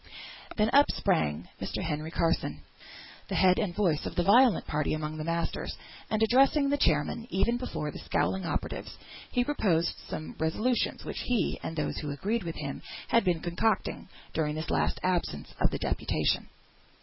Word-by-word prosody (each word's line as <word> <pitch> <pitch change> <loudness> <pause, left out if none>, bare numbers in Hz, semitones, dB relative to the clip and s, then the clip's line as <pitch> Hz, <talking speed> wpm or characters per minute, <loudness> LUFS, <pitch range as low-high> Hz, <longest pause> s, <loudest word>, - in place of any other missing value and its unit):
Then 215 +1 +3
up 285 +1 +7
sprang 160 - 0
Mr. - - -3
Henry 155 0 -2
Carson, 165 0 0 0.6
the - - -3
head 185 -1 +5
and 190 -6 -1
voice 175 -8 +2
of - - -6
the 175 - +2
violent 240 +5 +5
party 150 0 0
among 155 0 -4
the 155 - -3
masters, 170 +1 -2 0.3
and 220 0 +1
addressing 275 +5 +4
the 285 - +2
chairman, 230 - +1
even 215 +6 +1
before 155 -11 -4
the - - -8
scowling 190 0 0
operatives, 165 - -4 0.3
he 245 - +2
proposed 185 - +1
some 155 - -5
resolutions, 215 +10 0
which - - -4
he, 235 -8 0
and 165 - -5
those 155 - -2
who 150 - -4
agreed 205 +11 -1
with 165 -3 -5
him, 140 -2 -5 0.3
had 230 - +4
been 175 -4 +1
concocting 175 +6 -1 0.2
during 150 -2 0
this 155 +1 -4
last - - +1
absence 175 - -1
of - - +4
the - - -3
deputation. - - 0
175 Hz, 170 wpm, -29 LUFS, 155-225 Hz, 0.6 s, up